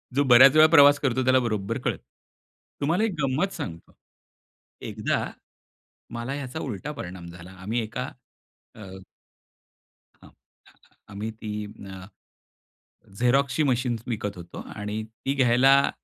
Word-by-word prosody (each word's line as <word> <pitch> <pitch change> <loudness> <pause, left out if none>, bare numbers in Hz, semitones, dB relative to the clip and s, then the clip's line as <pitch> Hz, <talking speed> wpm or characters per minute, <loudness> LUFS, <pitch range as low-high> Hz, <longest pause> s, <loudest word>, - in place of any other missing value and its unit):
जो 145 - +3
बऱ्याच 130 +2 +7
वेळा 155 0 +8
प्रवास 145 -3 +7
करतो, 130 -2 0
त्याला 130 0 +5
बरोबर 105 -5 -2
कळतं. - - -2 0.8
तुम्हाला 165 +8 +1
एक 225 - +1
गंमत 140 +9 0
सांगतो. 85 -2 -8 0.8
एकदा - - -2 0.9
मला 120 +3 -4
याचा 140 +1 -6
उलटा 130 +2 -5
परिणाम 90 -7 -8
झाला. 85 +1 -12
आम्ही 95 +6 -4
एका 125 +5 -5 0.6
अ, - - -12 1.4
अ, - - -14 0.8
आम्ही 105 +2 -5
ती 110 -1 -7 0.4
अ, 95 -1 -9 1.1
झेरॉक्सची 135 +5 +2
मशीन 125 -3 0
विकत 105 -5 -4
होतो 85 -1 -9 0.2
आणि 105 +1 -4
ती 115 +5 -5
घ्यायला 135 +1 +4
125 Hz, 120 wpm, -25 LUFS, 105-140 Hz, 1.4 s, वेळा